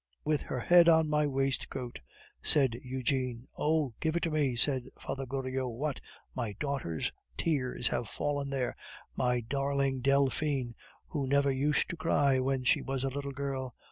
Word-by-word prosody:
"With 150 -2 +1
her 125 - -4
head 175 +2 +7
on 160 -1 +5
my 150 0 +2
waistcoat," 135 - -2 0.4
said 135 -5 +5
Eugene. 130 -2 -2
"Oh! 150 -4 +1
give 160 0 0
it 170 - 0
to 165 - 0
me," 145 -5 +1
said 130 +1 +3
Father 135 -1 -5
Goriot. 130 0 -2
"What! 135 +4 -3 0.3
my 115 -5 -3
daughter's 135 - -2 0.3
tears 130 -6 0
have 115 - -2
fallen 145 -1 -2
there 135 -3 -1 0.4
my 125 -1 +1
darling 140 +2 0
Delphine, 140 -1 +1 0.4
who 140 -4 -2
never 140 +1 +3
used 140 +2 +1
to 175 - -6
cry 145 -4 +2
when 130 0 0
she 125 - +3
was 135 -1 -2
a 135 - +1
little 140 +1 -4
girl! 135 -2 -4
135 Hz, 160 wpm, -31 LUFS, 130-145 Hz, 0.4 s, head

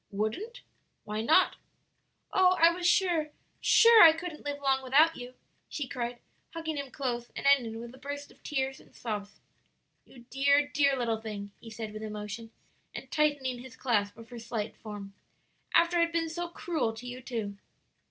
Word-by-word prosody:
"Wouldn't? 335 - -3 0.4
why 215 +1 -3
not?" 235 +8 +4 0.8
"Oh, 375 -2 +5
I 335 +1 +7
was 350 0 -1
sure, 350 -4 +2 0.3
sure 460 -1 +7
I 325 -2 +10
couldn't 330 -1 -7
live 285 0 -4
long 270 -1 +1
without 295 +6 +4
you," 250 +1 -9 0.3
she 290 -4 -4
cried, 245 -1 -4 0.4
hugging 320 -1 -3
him 280 -1 -4
close 245 -3 -3
and - - -6
ending 245 -5 +3
with 235 +1 -9
a 260 - -14
burst 285 +1 -6
of - - -22
tears 270 -2 -2
and - - -21
sobs. 210 -3 -5 0.7
"You 240 -2 -16
dear, 280 +2 +3
dear 280 -2 +2
little 230 -3 -1
thing!" 205 -2 -6
he 230 - -11
said 220 -1 -6
with 215 - -7
emotion, 210 +1 -6 0.5
and - - -8
tightening 290 -5 +1
his 255 0 -11
clasp 210 -6 0
of 230 0 -12
her 240 -1 -8
slight 225 -2 -4
form; 205 -2 -9 0.6
"after 340 +1 +4
I 335 - +5
had 335 - -8
been 330 -1 0
so 345 +2 -4
cruel 330 -8 -2
to 230 +3 -10
you, 250 +1 -7
too!" 220 -6 -4
260 Hz, 180 wpm, -29 LUFS, 225-315 Hz, 0.8 s, I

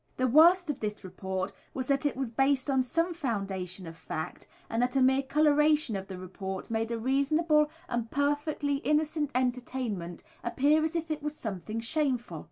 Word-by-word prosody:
The 255 - +2
worst 330 +6 +6
of 280 - -8
this 210 -1 -4
report 190 +1 -4 0.2
was 260 -1 -3
that 275 +1 +2
it 280 - -3
was 265 -4 -2
based 270 +3 +2
on 265 -1 +3
some 330 +7 0
foundation 195 - -3
of 165 0 -8
fact, 160 +1 -6 0.2
and 230 - -1
that 250 +1 0
a - - +4
mere 265 +1 +4
colouration 300 -2 +3
of 195 0 -4
the 190 - -7
report 190 +2 -6
made 225 0 0
a 235 - -1
reasonable 300 +5 +2 0.2
and 235 -2 -2
perfectly 285 0 0
innocent 300 +1 0
entertainment 245 -8 -2 0.2
appear 290 +6 +3
as 320 +2 -1
if 325 -1 -2
it 305 -1 -2
was 300 0 -3
something 215 - -4
shameful. 245 - -1
260 Hz, 175 wpm, -29 LUFS, 215-300 Hz, 0.2 s, worst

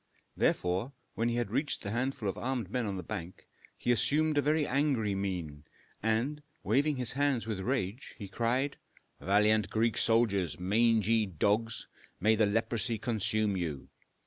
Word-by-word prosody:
Therefore, 95 +9 0 0.2
when 115 +1 0
he 120 - -1
had 120 -4 -1
reached 140 +5 -1
the 100 - -4
handful 120 -1 -1
of 95 - -1
armed 125 -6 -3
men 125 -2 0
on 100 -1 -3
the 90 - -5
bank, 90 -1 -6 0.3
he 120 - 0
assumed 145 +7 +2
a 145 - +4
very 150 +2 +2
angry 135 -7 +1
mien, 90 -7 -3 0.4
and, 115 +8 0 0.2
waving 140 +8 +2
his 125 -2 -1
hands 140 -4 +1
with 110 -3 -3
rage, 115 +1 -2 0.2
cried, 125 +5 0 0.4
"Valiant 105 0 +3
Greek 110 +2 +1
soldiers! 100 -8 +2
mangy 110 +2 +3
dogs, 105 +6 0 0.3
may 110 +5 +4
the 110 -1 +3
leprosy 115 +2 0
consume 110 -2 0
you! 80 -7 -4
110 Hz, 150 wpm, -31 LUFS, 100-125 Hz, 0.4 s, a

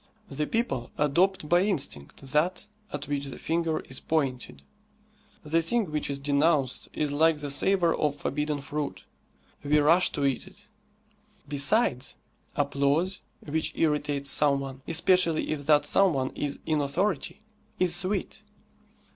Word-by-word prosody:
The 150 +2 -2
people 135 - -1
adopt 160 +4 +2
by 175 +3 +4
instinct 140 - -2
that 175 +6 +1 0.3
at 145 -1 -5
which 140 -1 -2
the 135 -3 -7
finger 165 -1 -1
is 130 - -7
pointed. 130 - -2 0.8
The 160 +2 +1
thing 200 +1 -1
which 150 -1 -1
is 140 - -2
denounced 140 -1 +1
is 150 -2 -1
like 160 +2 +3
the 145 -1 -3
savour 175 +3 +2
of 150 -2 0
forbidden 150 0 -2
fruit; 145 +1 -4 0.6
we 145 +1 +3
rush 165 +5 +4
to 140 - -1
eat 135 +6 -1
it. 205 +2 -16 0.8
Besides, 140 - +1 0.4
applause 145 +6 +1 0.3
which 155 +1 -1
irritates 145 -3 0
some 145 -2 +3
one, 135 -1 -7
especially 165 0 +2
if 145 -2 -4
that 145 -1 +5
some 195 +2 +4
one 130 -1 -1
is 145 -1 -3
in 155 -2 +1
authority, 170 +7 -2 0.3
is 175 -1 +3
sweet. 185 +3 -2
150 Hz, 140 wpm, -27 LUFS, 140-170 Hz, 0.8 s, that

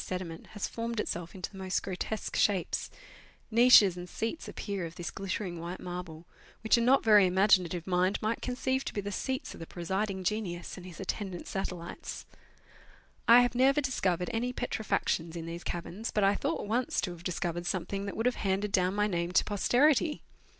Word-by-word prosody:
249 180 -3 -4
sediment - - -16
has 205 - -2
formed 230 -1 -4
itself 175 -4 -3
into 185 - -5
the 195 - -11
most 190 0 -1
grotesque 195 +3 -4
shapes; 195 -4 +1 0.6
niches 225 -5 +7
and 175 0 -8
seats 225 - -4
appear 200 -3 -4
of 165 0 -6
this 175 -2 -5
glittering 190 -2 -4
white 170 +2 -5
marble, 175 -2 -7 0.4
which 220 - +5
a 235 - +2
not 255 +4 +4
very 210 -4 +7
imaginative 180 -2 +3
mind 185 +1 +2
might 220 +2 -1
conceive 260 +1 -1
to - - -5
be 205 - 0
the 200 +1 -5
seats 260 +6 -3
of - - -11
the 165 - -7
presiding 190 +2 -2
genius 180 -3 -2
and 185 -1 -10
his 175 - -11
attendant 195 -2 -4
satellites. 180 -3 -5 1.0
I 235 +1 +9
have 245 0 +1
never 265 +4 +4
discovered 190 - 0
any 240 +2 0
petrifactions 205 -8 -1
in 165 -1 -5
these 170 +1 -6
caverns, 180 +6 -4
but 210 - +1
I 195 +1 +5
thought 280 +6 -2
once 235 +4 0
to 180 - -2
have 175 -1 -10
discovered 175 -1 -2
something 195 +2 -2
that 200 - -5
would 225 - -1
have 250 - +2
handed 195 +1 0
down 185 -1 +2
my 210 0 +2
name 175 -3 -1
to - - +5
posterity. 285 - +2
195 Hz, 190 wpm, -30 LUFS, 175-225 Hz, 1.0 s, I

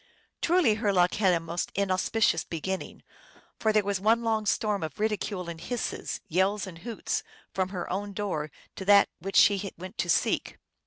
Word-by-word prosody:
Truly 345 -9 +4
her 205 - +2
luck 180 -2 +3
had 195 -3 +3
a 170 - +2
most 165 +1 -4
inauspicious 195 -1 +2
beginning, 185 +3 -5 0.6
for 220 - +2
there 215 -1 +3
was 200 -1 -1
one 225 +3 +3
long 220 -2 0
storm 210 -1 +1
of 155 +1 -5
ridicule 210 -4 -1
and 165 -1 -7
hisses, 245 +6 -3
yells 190 +4 +1
and 175 -3 -9
hoots, 230 +3 -3 0.3
from 185 -1 0
her 180 -3 -4
own 200 +2 -3
door 185 -7 -2 0.3
to 190 - -5
that 200 0 +6
which 195 +3 -6
she 200 -1 +4
went 185 +3 -9
to - - 0
seek. - - +1
195 Hz, 175 wpm, -28 LUFS, 180-215 Hz, 0.6 s, that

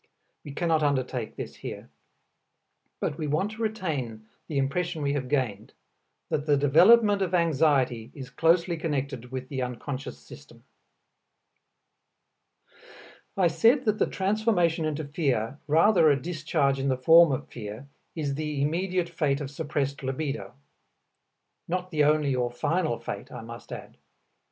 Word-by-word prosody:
We 145 - -8
cannot 160 +1 +1
undertake 140 -4 -1
this - - -7
here. - - -8 1.1
But 145 - -3
we 155 - -2
want 155 +8 0
to 220 +1 -9
retain 150 - -3 0.2
the 150 - -3
impression 155 +4 -1
we 140 0 +1
have 130 -3 -3
gained, 115 -7 -1 0.6
that 145 +1 -2
the 145 -1 +4
development 200 +9 +5
of 185 -1 0
anxiety 140 -8 +2
is 135 -2 -9
closely 170 +3 +2
connected 140 -6 -3
with 130 -1 -5
the 130 -2 -4
unconscious 125 - -5
system. 70 - -15 2.7
I 190 - +3
said 230 - +3
that 215 -1 +1
the - - +3
transformation 190 -5 +1
into 155 0 -2
fear, 140 -4 -1
rather 165 +2 +5
a 140 -2 +3
discharge 155 -3 0
in 135 - -1
the 130 - +1
form 165 +4 +7
of 130 - -3
fear, 110 +4 -8 0.3
is 145 -4 -2
the 150 0 -3
immediate 175 +5 0
fate 150 -5 0
of 140 -2 -5
suppressed 145 -2 -2
libido. 135 +2 -4 1.1
Not 180 +1 -3
the 150 -3 +3
only 150 -2 +2
or 125 -1 0
final 150 +1 -1
fate, 100 -3 -7
I - - -7
must 115 +1 -10
add. - - -9
150 Hz, 140 wpm, -27 LUFS, 135-170 Hz, 2.7 s, form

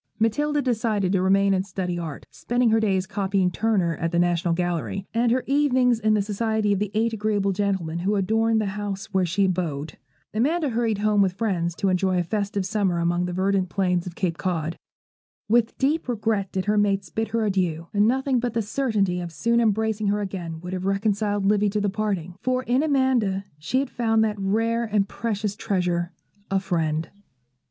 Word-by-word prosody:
Matilda 290 +7 +1
decided 220 -6 0
to 190 -2 +2
remain 195 +1 +3
and 190 -1 +1
study 180 -2 -3
art, 160 -4 -6
spending 240 -1 0
her 225 - +4
days 190 -4 +1
copying 195 -2 0
Turner 185 -4 +1
at 165 0 -2
the 170 - 0
National 175 -1 +2
Gallery, 170 - -2
and 230 +1 +2
her 255 +1 +1
evenings 260 -4 +3
in 215 -1 +2
the 205 - +1
society 215 0 0
of 195 - -1
the 210 -1 -1
eight 225 +1 +1
agreeable 205 -2 0
gentlemen 190 -4 -1
who 195 +4 0
adorned 220 +3 +2
the 215 - 0
house 205 0 -5
where 190 -2 +2
she 195 +4 +2
abode. 165 -5 -2 0.3
Amanda 295 +8 +1
hurried 230 -3 0
home 210 0 +2
with 190 -2 +2
friends 180 -5 -1
to 195 - 0
enjoy 185 0 +1
a 175 - +2
festive 200 +1 -2
summer 195 -3 0
among 175 +1 +1
the 180 - -3
verdant 190 0 0
plains 180 -2 0
of 175 - -7
Cape 175 -4 -2
Cod. 165 -3 -2 0.7
With 230 +1 +2
deep 280 +1 0
regret 215 -4 -1
did 190 -1 -2
her 210 0 +2
mates 195 -4 0
bid 225 +4 -1
her 230 -1 0
adieu, 180 -5 0
and 205 +1 +4
nothing 265 +1 +1
but 240 -1 -3
the 230 - +1
certainty 205 -6 0
of 175 -1 -5
soon 235 +10 +1
embracing 220 -1 +1
her 205 +1 +1
again 175 -5 -5
would 180 +1 -6
have 185 0 -3
reconciled 205 0 0
Livy 205 0 +3
to 210 +1 -1
the 205 -1 0
parting; 195 -5 -2
for 255 0 0
in 250 +2 +2
Amanda 260 -10 +1 0.2
she 160 +12 -1
had 270 -1 0
found 225 -2 +2
that 210 -2 -1
rare 225 +4 +1
and 210 -3 +1
precious 210 -2 -3
treasure, 180 -4 -1 0.4
a 195 - +2
friend. 165 -4 -1
200 Hz, 195 wpm, -24 LUFS, 185-225 Hz, 0.7 s, her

